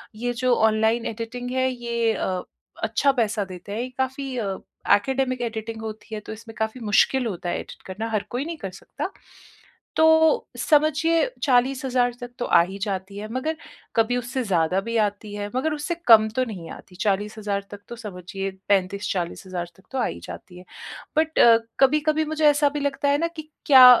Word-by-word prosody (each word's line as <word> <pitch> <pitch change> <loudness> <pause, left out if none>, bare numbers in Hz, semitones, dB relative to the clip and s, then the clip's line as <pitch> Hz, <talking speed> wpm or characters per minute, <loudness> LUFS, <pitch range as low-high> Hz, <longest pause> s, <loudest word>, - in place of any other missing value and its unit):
ये 245 +2 -2
जो 250 -1 +4
online 220 +1 +2
editing 235 +2 -5
है 260 0 +1
ये 235 -2 0
अ, 185 -3 -2 0.4
अच्छा 225 +5 +3
पैसा 220 -4 0
देते 185 +1 -9
हैं, 230 - -2
ये 255 - -4
काफ़ी 265 0 -2
अ, 195 -4 -2 0.3
ऐकडेमिक 255 +3 +2
एडिटिंग 225 -1 -4
होती 220 0 -7
है - - -4
तो - - -6
इसमें 225 +1 -11
काफ़ी 220 +3 -2
मुश्किल 250 +5 +3
होता 175 -4 -4
है - - -1
एडिट - - -10
करना 205 +4 -4
हर 215 -2 0
कोई 250 +4 -2
नहीं 335 0 -5
कर 195 -9 -6
सकता। 185 - -6 0.8
तो 320 +8 +5
समझिए 310 +2 +3 0.2
40,000 255 -2 +2
तक 245 - -6
तो 245 - -1
आ 170 - +6
ही 190 +3 -6
जाती 195 -1 -4
है, 210 - -5
मगर 310 +5 -2 0.4
कभी 230 +2 +2
उससे 250 +2 -2
ज़्यादा 185 -1 +1
भी 230 +3 -4
आती 205 +1 -6
है, 205 0 -4
मगर 305 +4 0
उससे 300 +3 -3
कम 220 -2 +8
तो 255 - +3
नहीं 185 -8 -7
आती। 180 - -12
40,000 205 0 -1
तक 205 - -8
तो 235 - -6
समझिए 195 -2 -5 0.2
35,000-40,000 185 -2 -1
तक 190 - -20
तो 265 - -3
आ - - +2
ही - - -4
जाती 180 - -10
है। 180 - -14 0.5
बट 320 0 +2 0.4
कभी-कभी 305 +3 +3
मुझे 310 0 0
ऐसा 290 0 +3
भी 295 +1 -4
लगता 285 0 0
है 285 - +3
ना 335 - +1
कि 315 -2 -10 0.2
क्या 265 -3 +10
230 Hz, 185 wpm, -24 LUFS, 205-265 Hz, 0.8 s, क्या